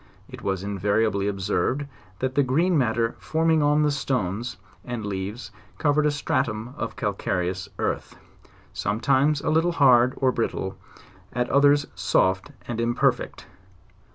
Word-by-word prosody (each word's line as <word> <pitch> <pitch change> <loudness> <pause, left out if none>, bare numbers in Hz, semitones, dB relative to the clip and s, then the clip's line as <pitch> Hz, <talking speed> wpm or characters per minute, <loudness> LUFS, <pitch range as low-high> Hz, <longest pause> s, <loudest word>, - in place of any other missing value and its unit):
It - - -10
was 95 -1 -2
invariably 100 +1 0
observed, 105 +8 -1 0.4
that 130 0 -1
the 145 - +3
green 160 +8 +2
matter 115 -4 +1
forming 160 0 +1
on 150 +1 +3
the 150 - +2
stones 120 -5 -2 0.3
and 120 -3 -5
leaves 100 +4 -5 0.3
covered 150 0 +2
a - - +4
stratum 125 -5 -2
of 115 - -4
calcareous 95 -2 -2
earth, - - -3 0.6
sometimes 140 +7 +1
a - - 0
liltle 165 +2 +2
hard, 130 -3 +5
or 130 -1 +2
brittle, 105 -5 -2 0.6
at 125 +1 -1
others 145 +1 +5
soft 95 0 +1 0.2
and 120 -1 -3
imper 120 +1 +3
fect. - - -9
120 Hz, 135 wpm, -25 LUFS, 105-145 Hz, 0.6 s, hard